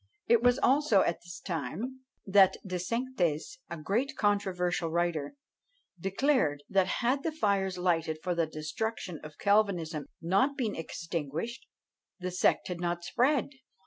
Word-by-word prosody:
It 235 -1 +4
was 245 +1 +4
also 270 -7 +4
at 170 - 0
this 175 -1 -9
time 185 - -4 0.3
that 195 -1 +5
De 185 -1 -2
Sainctes, 210 - -1
a 170 - -5
great 235 - -1
controversial 180 -5 +1
writer, 170 - -1 0.6
declared, 195 - +1
that 190 -1 +3 0.2
had 265 +3 +2
the 325 - -1
fires 200 -9 0
lighted 165 -3 +1
for 180 - 0
the 170 -1 +1
destruction 160 +3 -4
of 155 -1 -10
Calvinism 185 -7 +1
not 195 - +2
been 230 -6 -1
extinguished, 165 - -4 0.5
the 185 0 -3
sect 180 - +2
had 180 -2 -4
not 175 0 -1
spread! 255 - +2
185 Hz, 140 wpm, -30 LUFS, 165-230 Hz, 0.6 s, that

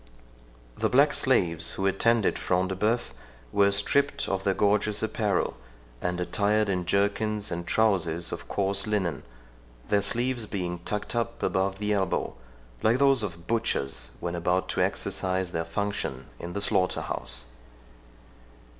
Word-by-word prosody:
The - - +2
black 140 +3 +5
slaves 90 - +3
who 95 - -2
attended 110 +3 +2
Front 90 0 +1
de 95 - -2
Bœuf 110 +5 0 0.4
were 100 +5 +4
stripped 140 +8 +1
of 95 0 -1
their 95 -1 +1
gorgeous 105 0 +2
apparel, 105 -3 0 0.5
and 90 0 -1
attired 105 +4 +1
in 90 -2 -1
jerkins 105 +2 +1
and 85 0 -4
trowsers 85 -6 +2
of - - -6
coarse 100 +1 0
linen, 95 -9 -1 0.7
their 100 -1 +3
sleeves 120 +2 -1
being 90 -4 -3
tucked 105 +6 -3
up 115 -1 -2
above 95 0 0
the 105 +1 0
elbow, 95 -2 0 0.5
like 115 +3 +3
those 135 -2 +4
of 85 -5 -5
butchers 70 - -1
when 85 - -3
about 90 +2 0
to - - 0
exercise 95 -1 0
their 80 -1 -1
function 80 -8 -3
in 85 +1 -6
the 100 - -2
slaughter 95 -3 +1
house. 60 0 -5
100 Hz, 145 wpm, -27 LUFS, 90-105 Hz, 0.7 s, black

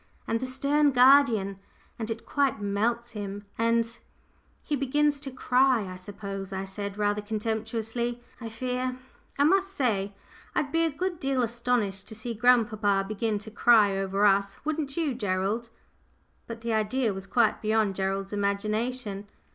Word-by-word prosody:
and 230 - 0
the 260 - -3
stern 285 +3 +2
guardian, 245 -7 +5 0.4
and 220 -1 -3
it 225 0 -5
quite 275 -6 +1
melts 230 +4 -1
him, 205 -2 -6
and 230 0 +1 0.3
" - - -37
"He 295 - -1
begins 285 +2 +1
to 275 -1 -4
cry, 255 -3 +2
I 185 - -7
suppose," 195 0 -7
I 190 0 -3
said, 200 +1 -5
rather 205 0 +1
contemptuously, 225 +2 -2 0.2
I 230 -2 -6
fear; 250 +2 -3 0.4
"I 285 - +4
must 385 +5 +4
say 205 - 0 0.4
I'd 280 -2 0
be 330 0 +2
a - - +1
good 350 +3 -3
deal 270 -2 0
astonished 235 -4 -1
to 220 - -5
see 230 +2 -4
grandpapa 215 -4 +3
begin 215 +1 -1
to 220 - -9
cry 215 -3 +5
over 195 +1 +1
us, 200 0 +3
wouldn't 305 -2 -2
you, 315 -5 0
Gerald?" 205 +1 -1 0.8
But 230 0 -7
the 230 -1 -2
idea 220 +1 +1
was 195 0 -7
quite 230 +2 +2
beyond 215 -2 +2
Gerald's 195 +1 -2
imagination. 205 +1 -2
225 Hz, 155 wpm, -27 LUFS, 200-255 Hz, 0.8 s, guardian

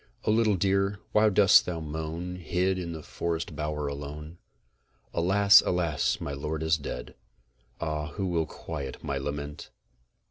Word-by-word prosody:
O - - +3
LITTLE 110 -2 +3
DEER, 100 +1 +1
WHY 105 0 +5
DOST 100 -1 +6
THOU 85 -2 -2
MOAN, 80 +3 -4
HID 90 +2 0
IN 85 -2 -4
THY 80 -2 -7
FOREST 85 -1 -3
BOWER 75 -1 -2
ALONE? 75 +3 -7 0.7
Alas! 100 +4 +6
alas! 85 -4 0
my 70 - -4
lord 75 +3 -3
is 80 0 +3
dead! 70 - -6 0.7
Ah! 75 -2 -2
who 100 - -2
will 85 -3 0
quiet 70 -5 -7
my 70 -1 -2
lament? 75 +1 -5
80 Hz, 145 wpm, -28 LUFS, 75-95 Hz, 0.7 s, DOST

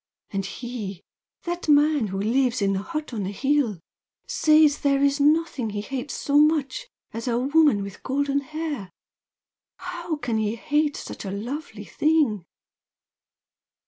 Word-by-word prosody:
And 195 -1 -2
he, 215 -6 -6 0.4
that 345 -2 -4
man 295 -4 +4
who 195 0 -4
lives 250 +4 +1
in 195 -1 +1
the 190 - -1
hut 305 +2 -5
on 220 - -2
the 190 - -2
hill 265 -2 +1 0.5
says 305 -1 +4
there 275 -1 +2
is 280 +1 +2
nothing 295 -5 +2
he 205 0 -3
hates 270 +5 -5
so 285 0 +2
much 310 - +2 0.2
as 230 +1 -6
a 235 -1 +1
woman 280 -4 +3
with 200 -1 -9
golden 280 +1 0
hair! 295 - -5 0.9
How 325 - -4
can 245 -6 -2
he 215 +1 0
hate 295 +5 0
such - - -7
a 195 - -5
lovely 220 +1 -5
thing!" 290 - +1
275 Hz, 145 wpm, -24 LUFS, 215-300 Hz, 0.9 s, man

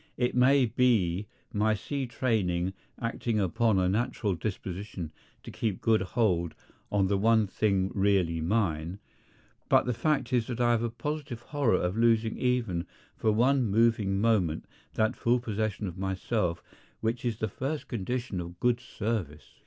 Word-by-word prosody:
It 125 0 +1
may 130 +2 +5
be 105 -6 +2 0.3
my 110 +1 +2
sea 135 +5 -3
training 95 -8 0 0.3
acting 115 -1 -1
upon 100 +3 +2
a 90 -1 +2
natural 105 0 0
disposition 95 -2 -5 0.3
to - - -8
keep 110 -5 -2
good 110 -2 +3
hold 90 -5 0 0.4
on 100 -2 +3
the 100 0 +1
one 110 +1 +4
thing 95 -1 0
really 95 -5 +2
mine, 85 -2 0 0.7
but - - +5
the 125 - 0
fact 135 -1 0
is 120 -3 +2
that 120 -2 -4
I 120 -1 +4
have 115 -1 +2
a 120 - 0
positive 145 0 -5
horror 130 -7 +1
of 90 +2 -1
losing 115 -1 +3
even 115 -9 0 0.3
for 110 - +1
one 125 +3 +3
moving 110 -2 +2
moment 100 -8 +1 0.3
that 110 0 +1
full 120 +1 +2
possession 110 -3 -2
of 90 -1 -6
myself 95 -1 -1 0.4
which 115 +2 -1
is 120 -3 -1
the 110 - -1
first 135 +9 -4
condition 120 -2 -3
of 85 +1 -9
good 120 -1 +2
service. 100 - -4
110 Hz, 155 wpm, -29 LUFS, 95-120 Hz, 0.7 s, may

